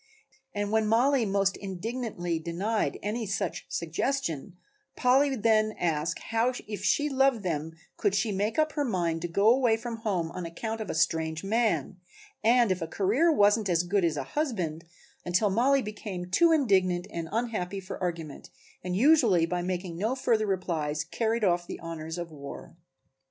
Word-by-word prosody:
And 205 0 -2
when 220 -1 +2
Mollie 240 +2 +3
most 195 0 +1
indignantly 195 -3 -3
denied 190 +7 -1
any 220 +2 -2
such 195 - -3
suggestion, 170 - -2 0.4
Polly 265 +3 +4
would 260 -6 -4
then 215 -1 +3
ask 165 -1 -1
how 230 +2 0 0.2
if 205 -2 -5
she 290 +10 +2
loved 270 -5 +2
them 160 -2 -2 0.2
could 205 -2 +1
she 210 +2 +1
make 205 +3 -1
up 310 0 +2
her 295 -2 -1
mind 170 -9 -1
to 175 - -2
go 200 +5 +1
away 245 -3 +3
from 230 0 -5
home 190 -7 -2
on 180 - -6
account 220 +7 -4
of 215 - -5
a - - -2
strange 160 0 0
man, 220 -2 0 0.5
and 235 -1 +4
if 185 -1 -1
a 165 - -2
career 215 - +2
wasn't 205 -5 +3
as 170 -1 +2
good 195 +2 +1
as 165 -3 +1
a 140 - -2
husband, 180 - -2 0.4
until 185 +4 +1
Mollie 260 +6 +3
became 200 -4 -6
too 335 - +5
indignant 190 - +2
and 165 -1 -5
unhappy 215 -5 -2
for 190 0 -8
argument 165 -5 -4 0.3
and 180 0 -2
usually 230 - +5
by 175 +1 -2
making 180 -1 -3
no 220 +7 0
further 225 -5 +1
replies 160 -6 -1
carried 225 0 -1
off 175 -2 +2
the - - -6
honors 165 0 -6
of 170 -1 -5
war. 140 0 -9
200 Hz, 170 wpm, -28 LUFS, 175-230 Hz, 0.5 s, too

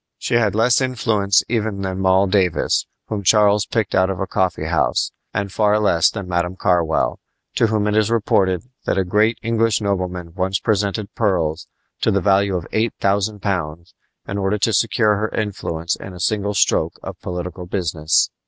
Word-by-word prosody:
She - - -4
had 110 -4 +2
less 120 +4 +3
influence 110 -6 +1
even 110 -4 -2
than 95 0 -3
Moll 95 +1 +3
Davis, 95 -3 +1 0.2
whom 105 -2 -4
Charles 105 +1 +4
picked 110 -5 -1
out 95 0 +3
of 95 -2 -3
a 95 - -1
coffee 95 -2 -1
house, - - 0 0.2
and 100 -1 -3
far 105 +1 +2
less 85 -6 +3
than 100 -4 -6
"Madam 90 0 -1
Carwell," 85 -4 +1 0.4
to 115 - +4
whom 110 -1 0
it 105 0 0
is 110 0 +2
reported 95 -5 +1 0.2
that - - 0
a 95 - +2
great 105 +5 +2
English 115 -1 +1
nobleman 90 -4 -3
once 95 +1 -1
presented 100 -1 -1
pearls 85 -7 -1 0.3
to - - +1
the 100 - +2
value 100 0 +2
of 85 -2 -3
eight 110 0 0
thousand 100 +1 0
pounds 85 -4 -3 0.3
in 100 - -3
order 95 +2 0
to 110 +2 +1
secure 110 0 +2
her 110 +1 -1
influence 85 -5 -3
in 95 - -10
a - - -10
single 105 +1 -1
stroke - - +2
of - - -8
political 90 0 -6
business. 80 -4 +1
100 Hz, 180 wpm, -20 LUFS, 90-105 Hz, 0.4 s, Charles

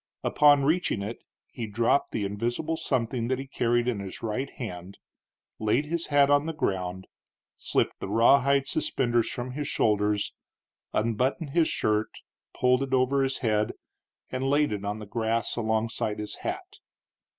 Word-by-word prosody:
Upon 145 -1 +5
reaching 155 - +1
it 110 +4 -5 0.3
he 115 -2 -5
dropped 115 +6 +1
the 105 - -1
invisible 120 +10 -2
something 120 -5 -1
that 130 +1 0
he 135 - -5
carried 120 -2 0
in 120 -5 0
his 95 +1 -7
right 120 +5 -2
hand, 95 -5 -7 0.6
laid 110 +7 +1
his 170 +2 -2
hat 145 -1 +5
on 145 +2 +3
the 165 - -2
ground, 95 -8 -2 0.5
slipped - - 0
the - - -5
rawhide 135 +5 +4
suspenders 120 -4 +1
from 125 +1 -4
his 145 +2 -4
shoulders, 105 -1 +1 0.6
unbuttoned 130 +7 0
his 165 +1 +3
shirt, 105 0 0 0.4
pulled 125 +1 +2
it 135 -1 0
over 130 +2 +2
his 135 0 0
head, 105 -1 +1 0.6
and 130 +1 -1
laid 145 -1 +3
it 105 -1 -3
on 105 +1 -2
the 105 - -8
grass 115 +2 -1
alongside 110 -1 -1
his 105 0 -5
hat. 370 +1 -6
120 Hz, 155 wpm, -27 LUFS, 105-140 Hz, 0.6 s, Upon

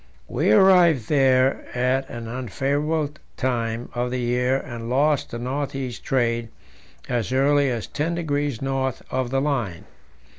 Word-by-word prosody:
We - - 0
arrived 170 - +5
there 135 -2 +3
at 130 +2 +1
an 115 -1 -6
unfavourable 140 +6 -1 0.2
time 120 -2 -2
of 125 0 -1
the 125 +1 -2
year 125 +2 +1
and 120 -4 -7
lost 145 +3 +2
the 120 - -5
north 135 +4 -3
east 130 -3 -5
trade 120 -3 0 0.6
as 120 -1 -1
early 140 +1 +3
as 120 -4 -2
ten 160 +4 -2
degrees 145 -6 -2
north 135 -1 -1
of 130 -1 -1
the 135 +1 +1
line. 120 - -2
130 Hz, 145 wpm, -23 LUFS, 120-145 Hz, 0.6 s, arrived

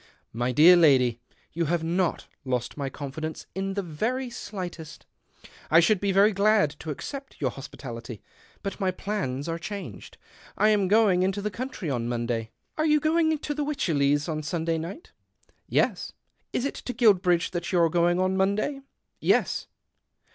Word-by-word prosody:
" - - -46
My 125 - +1
dear 160 +8 +8
lady, 130 -8 +4 0.3
you 170 +1 0
have 165 +1 0
not 175 +2 0 0.2
lost 125 -2 -2
my 140 -2 -3
confidence 150 +3 -6
in 195 0 -3
the 200 - -1
very 235 +10 -2
slightest. 180 -9 -7 0.6
I 165 - +7
should 200 +4 +3
be 200 0 0
very 200 +3 +5
glad 205 -5 +3
to 160 - -7
accept 275 - -7
your 130 -4 0
hospitality, 120 -4 -8 0.4
but 195 +1 -4
my 190 -2 +1
plans 185 -8 -3
are 165 0 -3
changed. 200 +3 -7 0.4
I 215 - +4
am 205 -3 +3
going 205 -3 +4
into 190 +2 0
the 210 +1 -3
country 220 - -4
on 120 -2 -2
Monday." 115 -2 -2
" - - -46
Are 310 - +2
you 300 0 +4
going 315 +1 +2
to 295 0 -4
the 295 0 -2
Wycherleys 145 - +1
on 155 -2 -2
Sun 160 +1 -3
day 165 -1 0
night? 185 - -8 0.2
" - - -41
" - - -44
Yes." - - 0 0.2
" - - -47
Is 250 - -1
it 280 - -2
to 250 - -6
Guilbridge 185 -7 +3
that 175 -1 -3
you 185 - +2
are 170 -1 +5
going 175 +2 +2
on 185 0 +1
Monday? 200 +9 0
" - - -53
" - - -48
Yes." - - +1
180 Hz, 190 wpm, -26 LUFS, 150-210 Hz, 0.6 s, dear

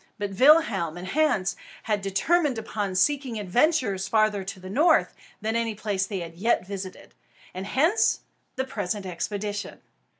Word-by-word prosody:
But 205 -1 -3
Willem 235 - +4
and 180 +1 -7
Hans 255 -9 +1 0.3
had 210 -2 0
determined 265 - +1
upon 205 -3 -3
seeking 265 +3 +1
adventures 210 - +1
farther 215 -1 +2
to 190 0 -7
the 185 - -10
north 310 - +3 0.3
than 220 +2 -1
any 230 -2 0
place 200 -2 -1
they 195 -3 -4
had 165 -1 -7
yet 195 +3 +1
visited; 190 -1 -8 0.4
and 185 +2 -5
hence 320 - +2 0.3
the 260 - -1
present 205 -5 -3
expedition. 205 +3 -4
205 Hz, 145 wpm, -26 LUFS, 190-255 Hz, 0.4 s, Willem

